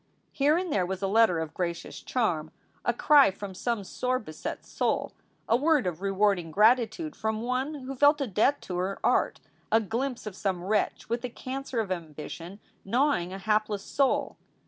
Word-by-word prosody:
Here 290 +3 +3
and 360 -3 -2
there 190 - +2
was 190 +2 -4
a - - +2
letter 220 -3 +4
of 160 -1 -4
gracious 170 -1 -4
charm, 170 -11 -1 0.3
a - - +2
cry 280 +3 +6
from 195 0 -7
some 230 +2 -2
sore 255 +6 -1
beset 155 -10 -6
soul, - - -1 0.3
a 225 - +4
word 295 0 +3
of 175 -1 -3
rewarding 195 -3 +1
gratitude 230 - +3
from 220 0 -2
one 255 +5 -1
who 270 -1 -6
felt 290 +3 +5
a 280 - 0
debt 245 +6 +2
to 180 - -4
her 190 +2 -1
art, - - +2 0.3
a 225 - +6
glimpse 235 +4 -3
of 210 -3 -6
some 190 -3 -2
wretch 210 +2 0
with 235 +1 -2
a 250 - -2
cancer 260 0 -5
of 210 -4 -2
ambition 165 +2 -6 0.2
gnawing 235 -5 +1
a 190 - -5
hapless 210 0 0
soul. 275 +4 0
215 Hz, 180 wpm, -28 LUFS, 185-255 Hz, 0.3 s, cry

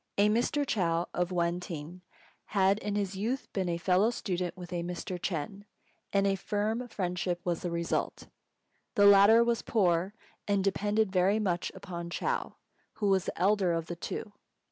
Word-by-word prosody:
A 205 +1 +5
Mr. 245 +6 +1
Chou, 170 -8 0
of 180 0 0
Wên 175 0 0
têng, 175 0 -7 0.4
had 195 0 +2
in 205 -1 -3
his 200 -2 -1
youth 230 +7 -3
been 180 -3 -1
fellow 185 +5 +3
student 185 -6 -3
with 180 0 -8
a 175 - -1
Mr. 175 +1 -5
Ch'êng, 190 +4 -4 0.5
and 200 0 +2
a 195 - +3
firm 210 +5 -2
friendship 180 -4 -2
was 175 -2 0
the 175 - -2
result. 170 0 -2 0.7
The 205 - +5
latter 200 +3 +8
was 235 -1 0
poor, 185 -2 +1 0.3
and 200 -1 +2
depended 205 +1 +1
very 190 +2 +3
much 180 -5 -1
upon 170 -2 -6
Chou, 475 - -2 0.4
who 210 -2 -1
was 190 -2 +2
the - - -5
elder 190 -2 +3
of 165 -1 -1
the 175 - -5
two. 205 +4 -6
190 Hz, 165 wpm, -30 LUFS, 175-205 Hz, 0.7 s, latter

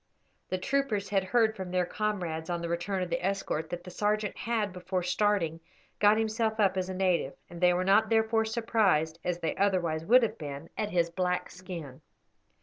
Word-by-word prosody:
The 185 - 0
troopers 215 -2 -1
had 195 -1 +1
heard 220 +2 +2
from 190 -3 -6
their 180 0 +1
comrades, 175 -6 -3
on 170 -1 -2
the 170 - -3
return 180 +3 -1
of 175 - -6
the 170 +1 -1
escort, 185 -5 -1
that 175 0 -5
the 180 - -9
sergeant 210 +2 0
had, 220 -4 -1
before 180 0 -3
starting, 180 -3 +1 0.4
got 210 +1 +5
himself 220 0 0
up 195 -2 +3
as 185 0 -2
a 185 - -4
native; 180 -7 +1 0.2
and 170 0 -9
they 180 0 +6
were 180 - +1
not 200 +3 +4
therefore 225 0 +2
surprised, 215 -8 +1
as 180 -1 -1
they 160 - -1
otherwise 180 -5 +1
would 245 +7 +6
have 230 - -2
been, 145 +1 -7
at 210 - -2
his 170 -3 +1
black 180 0 -1
skin. 170 -8 -8
185 Hz, 195 wpm, -29 LUFS, 175-215 Hz, 0.4 s, they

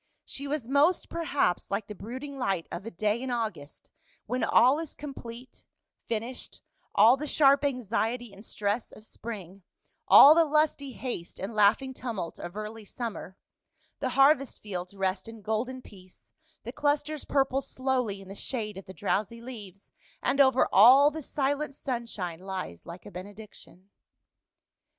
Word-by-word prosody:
She 280 +1 -6
was 280 -5 -3
most, 290 +7 +2
perhaps, 290 - 0
like 200 +1 -2
the 210 - -8
brooding 260 +8 -7
light 195 -9 -1
of 195 +5 -6
a - - -2
day 215 +4 -1
in 260 - -4
August, 215 - -5 0.3
when 250 +3 -2
all 260 +5 +5
is 325 -3 -5
complete, 255 -4 -9 0.4
finished, 235 +3 -4 0.4
all 225 +6 +7
the 300 +2 -5
sharp 280 -1 +4
anxiety 240 -3 -1
and 200 +1 -13
stress 210 +1 -2
of 215 - -14
spring, 200 -5 -8 0.5
all 290 - +10
the 335 +1 +5
lusty 300 -3 +1
haste 235 -11 -6
and 195 +4 -5
laughing 215 +6 +3
tumult 220 -10 -5
of 175 +4 -7
early 215 +1 -6
summer; 210 -3 -6 0.6
the - - -1
harvest 275 -1 +4
fields 185 -2 -6
rest 190 +1 -2
in 225 -2 -11
golden 240 +5 -2
peace, 185 -2 -17 0.3
the 240 - -6
clusters 290 +2 -1
purple 270 -1 +1
slowly 255 -8 -2
in 195 - -13
the 195 - -8
shade 210 -2 -5
of 195 - -13
the 190 - -10
drowsy 215 +2 -1
leaves, 210 -6 -11 0.3
and 270 +2 +3
over 265 -1 +4
all 265 +8 +8
the 315 +1 -6
silent 285 +1 -2
sunshine 230 - -4
lies 185 - -6
like 170 +1 -10
a - - -10
benediction. 195 0 -11
230 Hz, 155 wpm, -28 LUFS, 200-270 Hz, 0.6 s, all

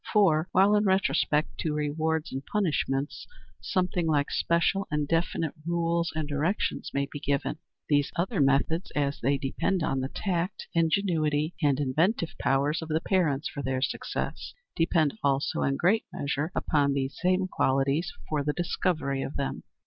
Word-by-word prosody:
For, 180 -6 +3
while 195 +3 +5
in 210 0 +3
respect 160 -6 +1
to 155 -2 -1
rewards 155 +1 -1
and 135 +1 -4
punishments 145 -7 -1 0.3
something 180 -2 0
like 145 -2 +1
special 170 +4 +1
and 150 -1 -1
definite 165 -1 0
rules 170 0 0
and 155 -2 -2
directions 150 +7 -1
may 140 0 0
be 145 - -6
given, 140 +2 -1 0.3
these 145 -1 +2
other 175 -3 0
methods, 140 +6 +2
as 140 -1 0
they 140 +3 +2
depend 155 +6 -1
on 135 -3 0
the 130 +1 -2
tact, 180 +1 -2
ingenuity, 160 -2 +1
and 145 -3 +2
inventive 160 - +1
powers 140 +5 +1
of 160 - -6
the 155 +1 +1
parents 165 -7 +1
for 140 - -5
their 130 -1 -1
success, - - -3 0.2
depend 165 +3 +1
also 140 0 +1
in 135 0 +1
great 200 +6 +2
measure 145 +3 -2
upon 140 -2 +2
these 135 0 -2
same 185 +1 +2
qualities 135 +2 +1 0.2
for 150 -2 -1
the 150 +1 0
discovery 160 -5 -1
of 135 - -5
them. 140 - -3
155 Hz, 155 wpm, -28 LUFS, 140-175 Hz, 0.3 s, while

